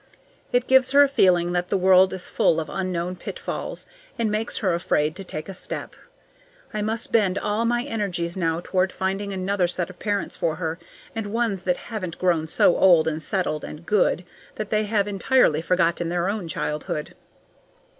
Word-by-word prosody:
It 245 Hz, 0 st, +2 dB
gives 260 Hz, 0 st, +4 dB
her 285 Hz, +1 st, +8 dB
a -, -, +4 dB
feeling 180 Hz, -10 st, +3 dB
that 175 Hz, 0 st, -1 dB
the 195 Hz, -, +2 dB
world 185 Hz, 0 st, +5 dB
is 190 Hz, -1 st, -5 dB
full 165 Hz, -, +2 dB
of 155 Hz, -, -5 dB
unknown 180 Hz, -2 st, -2 dB
pitfalls, -, -, -5 dB, 0.3 s
and 225 Hz, -2 st, 0 dB
makes 215 Hz, +2 st, -2 dB
her 190 Hz, -5 st, +1 dB
afraid 155 Hz, -3 st, +1 dB
to 195 Hz, -, -7 dB
take 155 Hz, -4 st, -6 dB
a 195 Hz, -, -6 dB
step. 180 Hz, -, -5 dB, 0.8 s
I 215 Hz, -, -2 dB
must 220 Hz, +2 st, -2 dB
bend 200 Hz, -4 st, +2 dB
all 210 Hz, +3 st, 0 dB
my 240 Hz, +1 st, +1 dB
energies 195 Hz, -9 st, -3 dB
now 165 Hz, -2 st, 0 dB
toward 185 Hz, 0 st, +1 dB
finding 195 Hz, +2 st, -2 dB
another 190 Hz, -1 st, 0 dB
set 175 Hz, 0 st, -3 dB
of 180 Hz, -, -19 dB
parents 205 Hz, -2 st, -2 dB
for 160 Hz, -2 st, -1 dB
her, 165 Hz, +1 st, -3 dB, 0.4 s
and 225 Hz, -2 st, -3 dB
ones 225 Hz, -4 st, 0 dB
that 180 Hz, -1 st, +1 dB
haven't 185 Hz, -7 st, -6 dB
grown 170 Hz, -3 st, +1 dB
so 165 Hz, -, +4 dB
old 175 Hz, -4 st, +5 dB
and 160 Hz, 0 st, -1 dB
settled 170 Hz, -4 st, -1 dB
and 155 Hz, +2 st, -8 dB
good 185 Hz, -3 st, +2 dB, 0.3 s
that 215 Hz, -2 st, -5 dB
they 215 Hz, 0 st, +2 dB
have 205 Hz, -1 st, +1 dB
entirely 200 Hz, -, +2 dB
forgotten 170 Hz, -1 st, +1 dB
their 175 Hz, +1 st, 0 dB
own 200 Hz, -4 st, -3 dB
childhood. 150 Hz, -1 st, -3 dB
185 Hz, 185 wpm, -24 LUFS, 170-210 Hz, 0.8 s, her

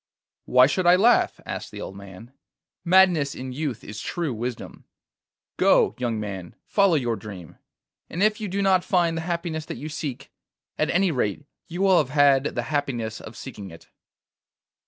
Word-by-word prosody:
'Why 125 Hz, 0 st, +6 dB
should 175 Hz, +6 st, 0 dB
I 175 Hz, -, +8 dB
laugh?' 225 Hz, +6 st, +3 dB
asked -, -, -5 dB
the -, -, -9 dB
old 95 Hz, -, -7 dB
man. 100 Hz, +5 st, -12 dB, 0.5 s
'Madness 175 Hz, -6 st, +4 dB
in 130 Hz, 0 st, -6 dB
youth 135 Hz, -5 st, -4 dB
is 105 Hz, +1 st, -8 dB
true 165 Hz, -6 st, -3 dB
wisdom. 120 Hz, +2 st, -6 dB, 0.7 s
Go, -, -, +4 dB
young 120 Hz, -3 st, -1 dB
man, 95 Hz, -4 st, -6 dB
follow 200 Hz, -4 st, +3 dB
your 120 Hz, -6 st, 0 dB
dream, 100 Hz, -7 st, -10 dB, 0.5 s
and 180 Hz, -, -1 dB
if 215 Hz, 0 st, +2 dB
you 210 Hz, -, -2 dB
do 200 Hz, +1 st, -2 dB
not 190 Hz, -2 st, +3 dB
find 175 Hz, -3 st, +1 dB
the 165 Hz, -, -2 dB
happiness 170 Hz, -2 st, -3 dB
that -, -, -6 dB
you 155 Hz, -, -6 dB
seek, 140 Hz, -4 st, -6 dB, 0.5 s
at -, -, +1 dB
any 185 Hz, 0 st, +2 dB
rate 125 Hz, 0 st, -2 dB, 0.2 s
you 180 Hz, +2 st, -3 dB
will 190 Hz, -2 st, +5 dB
have 140 Hz, -, 0 dB
had 140 Hz, -1 st, +4 dB
the 120 Hz, -, -1 dB
happiness 120 Hz, -6 st, -2 dB
of 110 Hz, -, -11 dB
seeking 105 Hz, -7 st, -8 dB
it. 85 Hz, -1 st, -15 dB
145 Hz, 175 wpm, -24 LUFS, 115-175 Hz, 0.7 s, I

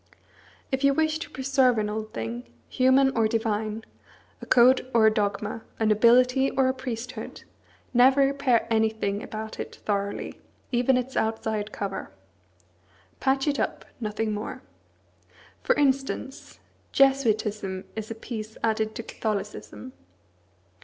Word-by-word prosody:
If 265 Hz, +1 st, -1 dB
you 275 Hz, 0 st, +4 dB
wish 315 Hz, 0 st, +1 dB
to -, -, -6 dB
preserve 265 Hz, -2 st, +2 dB
an 210 Hz, -1 st, 0 dB
old 215 Hz, +1 st, -4 dB
thing, 115 Hz, +1 st, -6 dB, 0.2 s
human 265 Hz, +1 st, +3 dB
or 225 Hz, -2 st, +3 dB
divine, 220 Hz, -1 st, -1 dB, 0.6 s
a -, -, -9 dB
code 255 Hz, +1 st, +5 dB
or 225 Hz, -1 st, +6 dB
a 220 Hz, -, +5 dB
dogma, 205 Hz, +1 st, -2 dB, 0.2 s
a 220 Hz, -, +1 dB
nobility 250 Hz, +5 st, +4 dB
or 265 Hz, -1 st, +2 dB
a 260 Hz, -, +2 dB
priesthood, 250 Hz, -2 st, -6 dB, 0.5 s
never 260 Hz, +3 st, +6 dB
repair 275 Hz, -3 st, +2 dB
anything 220 Hz, -2 st, +1 dB
about 220 Hz, 0 st, -7 dB
it -, -, -6 dB
thoroughly, 200 Hz, -1 st, -2 dB, 0.3 s
even 250 Hz, +1 st, +3 dB
its 255 Hz, +1 st, -3 dB
outside 220 Hz, -1 st, -1 dB
cover. 195 Hz, -, -4 dB, 1.1 s
Patch 270 Hz, +1 st, +1 dB
it 285 Hz, -1 st, +1 dB
up, -, -, -2 dB
nothing 215 Hz, -1 st, -2 dB
more. 210 Hz, 0 st, -5 dB, 1.0 s
For -, -, +2 dB
instance, 270 Hz, -1 st, -1 dB, 0.3 s
Jesuitism 215 Hz, -8 st, +2 dB
is 220 Hz, -1 st, -5 dB
a 225 Hz, -, -5 dB
piece 220 Hz, -1 st, -7 dB
added 220 Hz, -1 st, 0 dB
to 230 Hz, -, -5 dB
Catholicism. 215 Hz, +4 st, -5 dB
225 Hz, 130 wpm, -26 LUFS, 215-265 Hz, 1.1 s, or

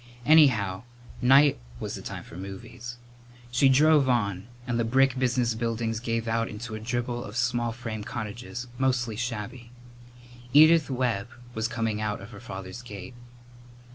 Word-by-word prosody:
Anyhow, 110 Hz, -12 st, +5 dB, 0.4 s
night 135 Hz, -, +6 dB, 0.2 s
was -, -, -4 dB
the -, -, -6 dB
time -, -, -6 dB
for -, -, -13 dB
movies. 105 Hz, +6 st, -8 dB, 0.5 s
She 135 Hz, +2 st, +4 dB
drove 145 Hz, 0 st, +5 dB
on, 100 Hz, -5 st, 0 dB, 0.2 s
and 120 Hz, -2 st, -1 dB
the -, -, +2 dB
brick 130 Hz, +2 st, +3 dB
business 125 Hz, -2 st, +1 dB
buildings 115 Hz, 0 st, -2 dB
gave 115 Hz, -1 st, -2 dB
out 115 Hz, 0 st, 0 dB
into 110 Hz, +2 st, -7 dB
a 110 Hz, -, -4 dB
dribble 120 Hz, +1 st, -2 dB
of 105 Hz, +3 st, -7 dB
small 120 Hz, -1 st, +1 dB
frame 115 Hz, -2 st, -5 dB
cottages, 120 Hz, +3 st, -6 dB
mostly 125 Hz, -4 st, +1 dB
shabby. 120 Hz, +1 st, -5 dB, 0.8 s
Edith 155 Hz, +1 st, +7 dB
Webb 125 Hz, -6 st, -1 dB, 0.3 s
was 110 Hz, -1 st, -1 dB
coming 115 Hz, -2 st, -2 dB
out 105 Hz, -1 st, -2 dB
of 100 Hz, +4 st, -11 dB
her 100 Hz, -, -10 dB
father's 95 Hz, -1 st, -8 dB
gate. 100 Hz, -4 st, -9 dB
120 Hz, 150 wpm, -27 LUFS, 110-125 Hz, 0.8 s, Edith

